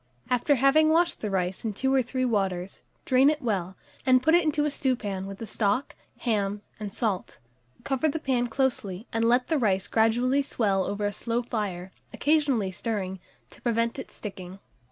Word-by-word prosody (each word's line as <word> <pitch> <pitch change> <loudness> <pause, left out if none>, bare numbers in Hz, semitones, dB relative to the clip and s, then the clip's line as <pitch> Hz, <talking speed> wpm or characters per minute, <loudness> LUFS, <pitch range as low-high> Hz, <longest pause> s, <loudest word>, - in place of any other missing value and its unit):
After 250 +4 +3
having 275 +4 +4
washed 340 +2 +2
the 215 - -2
rice 185 -1 -1
in 220 -2 -2
two 265 +6 0
or 265 - +4
three 255 +1 -2
waters, 195 -5 -1 0.2
drain 260 +2 +5
it 305 0 0
well, 190 -5 -1 0.3
and 255 -2 +4
put 320 - +4
it 345 0 +6
into 300 -1 +1
a 300 - 0
stewpan 210 -9 -2
with 195 0 -7
the 225 - -6
stock, 215 +4 -1 0.3
ham, 205 -3 -1 0.2
and 210 -2 -5
salt; 205 -3 -2 0.5
cover 275 +3 +1
the 295 - -2
pan 255 -5 0
closely, 225 -6 -1
and 225 0 +1
let 245 +2 +3
the 315 -3 +1
rice 195 -5 +1
gradually 240 +5 +2
swell 200 -8 0
over 205 +1 -2
a 205 - -1
slow 235 +3 -2
fire, 195 -6 -4 0.2
occasionally 285 -10 +1
stirring, 190 -1 -3 0.3
to - - -15
prevent 230 +1 0
its 265 - -9
sticking. 190 -3 -8
230 Hz, 180 wpm, -27 LUFS, 195-265 Hz, 0.5 s, it